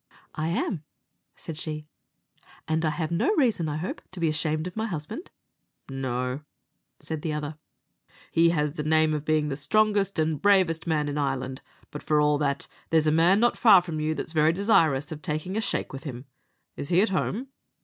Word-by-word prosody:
"I 155 Hz, 0 st, -2 dB
am," 170 Hz, -1 st, -1 dB, 0.5 s
said 160 Hz, -2 st, -8 dB
she; 155 Hz, -1 st, -5 dB, 0.8 s
"and 160 Hz, +1 st, 0 dB
I 155 Hz, -, +2 dB
have 160 Hz, +1 st, -3 dB
no 285 Hz, -, +2 dB
reason, 225 Hz, -, +2 dB
I 150 Hz, -, -2 dB
hope, 175 Hz, +5 st, -4 dB
to 185 Hz, -, -7 dB
be 165 Hz, -2 st, +2 dB
ashamed 155 Hz, +1 st, -1 dB
of 180 Hz, -, -6 dB
my 220 Hz, +1 st, -1 dB
husband." 175 Hz, -, -6 dB, 0.6 s
"No," 130 Hz, 0 st, -3 dB, 0.6 s
said 160 Hz, -2 st, -5 dB
the 155 Hz, -1 st, -2 dB
other, 150 Hz, 0 st, -4 dB, 0.7 s
"he 165 Hz, +1 st, +4 dB
has 150 Hz, -3 st, +1 dB
the 150 Hz, -, -4 dB
name 155 Hz, 0 st, +3 dB
of 150 Hz, -1 st, -2 dB
being 155 Hz, -1 st, +1 dB
the 135 Hz, -, -2 dB
strongest 205 Hz, +5 st, +1 dB
and 155 Hz, -2 st, 0 dB
bravest 185 Hz, -5 st, +3 dB
man 150 Hz, -2 st, +1 dB
in 145 Hz, +1 st, -2 dB
Ireland; 130 Hz, -2 st, -2 dB, 0.3 s
but 150 Hz, -, -7 dB
for 150 Hz, -1 st, +2 dB
all 150 Hz, 0 st, +3 dB
that, 140 Hz, -2 st, -1 dB, 0.2 s
there's 160 Hz, -1 st, +3 dB
a 155 Hz, -, +3 dB
man 170 Hz, +5 st, +4 dB
not 240 Hz, +1 st, +2 dB
far 210 Hz, -5 st, +8 dB
from 165 Hz, -3 st, -4 dB
you 155 Hz, +1 st, 0 dB
that's 160 Hz, -, -5 dB
very 155 Hz, 0 st, +4 dB
desirous 165 Hz, -7 st, +2 dB
of 155 Hz, -1 st, -6 dB
taking 155 Hz, +6 st, -3 dB
a 220 Hz, -, +1 dB
shake 220 Hz, -, -1 dB
with 135 Hz, -, -7 dB
him. 125 Hz, -2 st, -6 dB, 0.5 s
Is 140 Hz, -, -5 dB
he 180 Hz, +1 st, +4 dB
at 225 Hz, -, +1 dB
home?" 210 Hz, +7 st, -2 dB
155 Hz, 195 wpm, -26 LUFS, 150-180 Hz, 0.8 s, far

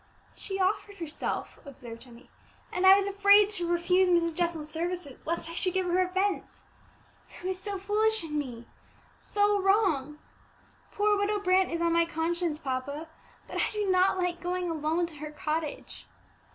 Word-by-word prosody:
"She 390 Hz, -1 st, -5 dB
offered 400 Hz, +1 st, 0 dB
herself," 330 Hz, -4 st, -4 dB
observed 250 Hz, -4 st, -10 dB
Emmie, 240 Hz, 0 st, -16 dB, 0.4 s
"and 370 Hz, +1 st, +2 dB
I 380 Hz, -, +10 dB
was 400 Hz, 0 st, +1 dB
afraid 400 Hz, +1 st, +5 dB
to 355 Hz, -5 st, -2 dB
refuse 360 Hz, +2 st, +3 dB
Mrs. 340 Hz, -1 st, +2 dB
Jessel's 335 Hz, -2 st, -2 dB
services, 330 Hz, -2 st, -4 dB
lest 335 Hz, 0 st, -1 dB
I 335 Hz, -, -7 dB
should 365 Hz, +2 st, 0 dB
give 375 Hz, -1 st, +1 dB
her 360 Hz, +1 st, +2 dB
offence. 375 Hz, +2 st, -1 dB, 0.7 s
It -, -, -11 dB
was 375 Hz, 0 st, -2 dB
so 405 Hz, -1 st, -3 dB
foolish 430 Hz, +2 st, +1 dB
in 305 Hz, -2 st, -5 dB
me 245 Hz, -5 st, -4 dB, 0.5 s
so 410 Hz, -1 st, +1 dB
wrong! 370 Hz, -8 st, +2 dB, 0.7 s
Poor 415 Hz, 0 st, +2 dB
Widow 410 Hz, +1 st, 0 dB
Brant 375 Hz, -1 st, +2 dB
is 335 Hz, 0 st, -1 dB
on 335 Hz, 0 st, +2 dB
my 335 Hz, 0 st, +4 dB
conscience, 335 Hz, 0 st, -1 dB
papa; 285 Hz, +2 st, -4 dB, 0.4 s
but -, -, -7 dB
I -, -, 0 dB
do 415 Hz, -2 st, 0 dB
not 370 Hz, +1 st, +3 dB
like 360 Hz, -1 st, -1 dB
going 360 Hz, -1 st, -2 dB
alone 320 Hz, +2 st, 0 dB
to 330 Hz, -3 st, -11 dB
her 305 Hz, +1 st, -6 dB
cottage." 305 Hz, 0 st, -4 dB
350 Hz, 165 wpm, -28 LUFS, 315-390 Hz, 0.7 s, I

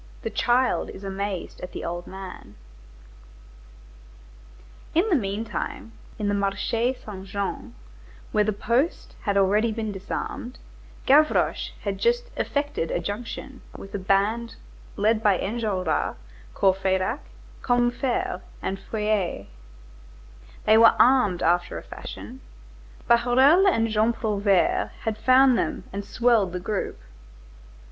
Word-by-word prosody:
CHAPTER -, -, -18 dB
IV—THE -, -, -2 dB
CHILD 250 Hz, +1 st, +2 dB
IS 190 Hz, -, -10 dB
AMAZED 195 Hz, -1 st, -4 dB
AT 180 Hz, -, -7 dB
THE -, -, -5 dB
OLD 175 Hz, +1 st, -4 dB
MAN 190 Hz, -, -9 dB, 2.4 s
In 350 Hz, +7 st, +3 dB
the 360 Hz, -, +4 dB
meantime, 215 Hz, 0 st, -3 dB, 0.3 s
in 210 Hz, -, -2 dB
the 205 Hz, -, +1 dB
Marché 205 Hz, +5 st, 0 dB
Saint 195 Hz, -2 st, -8 dB
Jean, 200 Hz, 0 st, -4 dB, 0.6 s
where 210 Hz, -, +3 dB
the 215 Hz, -, 0 dB
post 235 Hz, -, -1 dB
had 200 Hz, -2 st, +1 dB
already 205 Hz, +4 st, +3 dB
been 220 Hz, -1 st, -3 dB
disarmed, 205 Hz, +5 st, -5 dB, 0.5 s
Gavroche 300 Hz, +3 st, +3 dB
had 195 Hz, -2 st, -3 dB
just 485 Hz, +1 st, +1 dB
"effected 285 Hz, -, -2 dB
a -, -, -1 dB
junction" 230 Hz, +8 st, -6 dB, 0.2 s
with 195 Hz, -, -11 dB
a 205 Hz, -, -2 dB
band 205 Hz, +5 st, 0 dB, 0.4 s
led 215 Hz, +2 st, +2 dB
by 205 Hz, -4 st, +4 dB
Enjolras, 195 Hz, -6 st, -1 dB, 0.4 s
Courfeyrac, 190 Hz, +5 st, +1 dB, 0.4 s
Combeferre, 245 Hz, -5 st, 0 dB, 0.2 s
and 195 Hz, 0 st, -3 dB
Feuilly. 210 Hz, -, -2 dB, 1.2 s
They 220 Hz, +1 st, +6 dB
were 230 Hz, 0 st, +7 dB
armed 240 Hz, -8 st, +4 dB
after 175 Hz, +1 st, +1 dB
a -, -, -8 dB
fashion. -, -, -9 dB, 0.7 s
Bahorel 260 Hz, +10 st, +5 dB
and 230 Hz, -11 st, +3 dB
Jean 220 Hz, +1 st, +2 dB
Prouvaire 205 Hz, -5 st, +1 dB
had 220 Hz, -1 st, -3 dB
found 255 Hz, +1 st, +5 dB
them -, -, -2 dB
and 200 Hz, +1 st, -4 dB
swelled 225 Hz, -4 st, +2 dB
the 180 Hz, -, -2 dB
group. 195 Hz, +2 st, -3 dB
215 Hz, 125 wpm, -25 LUFS, 195-240 Hz, 2.4 s, were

